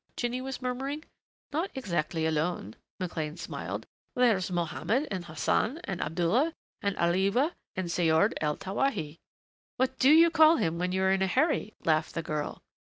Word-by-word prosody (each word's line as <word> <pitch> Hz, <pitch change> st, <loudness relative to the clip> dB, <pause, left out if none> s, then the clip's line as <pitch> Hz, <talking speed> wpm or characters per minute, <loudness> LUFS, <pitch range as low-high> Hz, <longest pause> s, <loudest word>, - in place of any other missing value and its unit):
Jinny 245 Hz, +1 st, -1 dB
was 265 Hz, 0 st, -6 dB
murmuring. 270 Hz, +4 st, -3 dB, 0.5 s
"Not 330 Hz, +6 st, 0 dB
exactly 170 Hz, -9 st, -1 dB
alone." 155 Hz, -, -1 dB, 0.2 s
McLean 165 Hz, -3 st, -3 dB
smiled. -, -, -5 dB, 0.3 s
"There's 225 Hz, -8 st, +3 dB
Mohammed 185 Hz, -, -1 dB
and 185 Hz, -3 st, -3 dB
Hassan 170 Hz, -, 0 dB
and 185 Hz, -2 st, -4 dB
Abdullah 180 Hz, -, +1 dB, 0.3 s
and 200 Hz, -1 st, -1 dB
Alewa 195 Hz, -, +2 dB, 0.2 s
and 185 Hz, -1 st, -2 dB
Saord 170 Hz, +4 st, +3 dB
el 150 Hz, -1 st, 0 dB
Tawahi 190 Hz, -, -2 dB, 0.3 s
" -, -, -90 dB
"What 260 Hz, +1 st, 0 dB
do 265 Hz, -, +5 dB
you 325 Hz, +2 st, +7 dB
call 320 Hz, 0 st, +6 dB
him 165 Hz, -, 0 dB
when 180 Hz, +1 st, 0 dB
you 190 Hz, +1 st, 0 dB
are 190 Hz, -, +4 dB
in 190 Hz, 0 st, +2 dB
a 190 Hz, -, +3 dB
hurry?" 250 Hz, -, +1 dB
laughed 155 Hz, -1 st, +1 dB
the 165 Hz, -, -2 dB
girl. 150 Hz, -1 st, -4 dB
190 Hz, 165 wpm, -29 LUFS, 165-260 Hz, 0.5 s, you